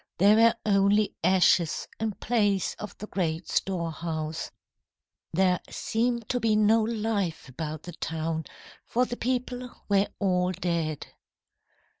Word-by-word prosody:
There 200 Hz, +3 st, +6 dB
were 230 Hz, +1 st, +5 dB
only 200 Hz, 0 st, +3 dB
ashes 180 Hz, -2 st, +3 dB
in 220 Hz, -1 st, -1 dB
place 205 Hz, -4 st, +1 dB
of 210 Hz, -3 st, -7 dB
the 210 Hz, -, -6 dB
great 170 Hz, -4 st, -2 dB
storehouse. 165 Hz, -3 st, -2 dB, 0.8 s
There 180 Hz, +1 st, +3 dB
seemed 235 Hz, 0 st, -1 dB
to 245 Hz, -, +1 dB
be 225 Hz, -2 st, +2 dB
no 215 Hz, +1 st, +4 dB
life 215 Hz, -7 st, -1 dB
about 155 Hz, +3 st, -5 dB
the 175 Hz, -, -7 dB
town, 160 Hz, 0 st, -3 dB, 0.4 s
for 250 Hz, +2 st, +1 dB
the 240 Hz, -, -4 dB
people 250 Hz, 0 st, -2 dB, 0.2 s
were 200 Hz, 0 st, +3 dB
all 180 Hz, -2 st, +1 dB
dead. 170 Hz, -4 st, -2 dB
195 Hz, 125 wpm, -27 LUFS, 170-220 Hz, 0.8 s, There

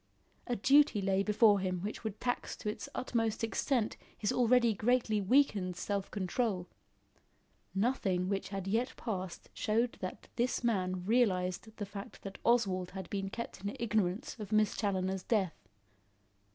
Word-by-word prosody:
A 245 Hz, -, 0 dB
duty 275 Hz, +1 st, +5 dB
lay 195 Hz, 0 st, +2 dB
before 210 Hz, 0 st, +5 dB
him 185 Hz, -2 st, -2 dB
which 210 Hz, +4 st, -5 dB
would 220 Hz, -2 st, -4 dB
tax 245 Hz, -1 st, -2 dB
to -, -, -8 dB
its 215 Hz, -, -5 dB
utmost 225 Hz, -3 st, -1 dB
extent 225 Hz, +1 st, 0 dB, 0.2 s
his 205 Hz, -, 0 dB
already 240 Hz, -1 st, +4 dB
greatly 220 Hz, 0 st, +2 dB
weakened 200 Hz, -5 st, +3 dB
self 195 Hz, +2 st, -2 dB
control. 195 Hz, -1 st, -1 dB, 1.1 s
Nothing 195 Hz, -4 st, +1 dB
which 195 Hz, -1 st, -2 dB
had 195 Hz, -1 st, -4 dB
yet 230 Hz, +6 st, 0 dB
passed 185 Hz, -6 st, -5 dB
showed 230 Hz, +3 st, 0 dB
that 185 Hz, +2 st, -5 dB
this 245 Hz, +1 st, 0 dB
man 185 Hz, -5 st, 0 dB
realised 190 Hz, -4 st, +2 dB
the 205 Hz, -, -3 dB
fact 200 Hz, 0 st, -9 dB
that 195 Hz, 0 st, -7 dB
Oswald 195 Hz, -7 st, +2 dB
had 190 Hz, -, -7 dB
been 195 Hz, -1 st, -2 dB
kept 235 Hz, -2 st, -6 dB
in 200 Hz, -, -3 dB
ignorance 210 Hz, -4 st, 0 dB
of 210 Hz, -1 st, -6 dB
Miss 215 Hz, -1 st, +3 dB
Challoner's 190 Hz, -2 st, 0 dB
death. 185 Hz, -, -1 dB
205 Hz, 150 wpm, -33 LUFS, 190-235 Hz, 1.1 s, duty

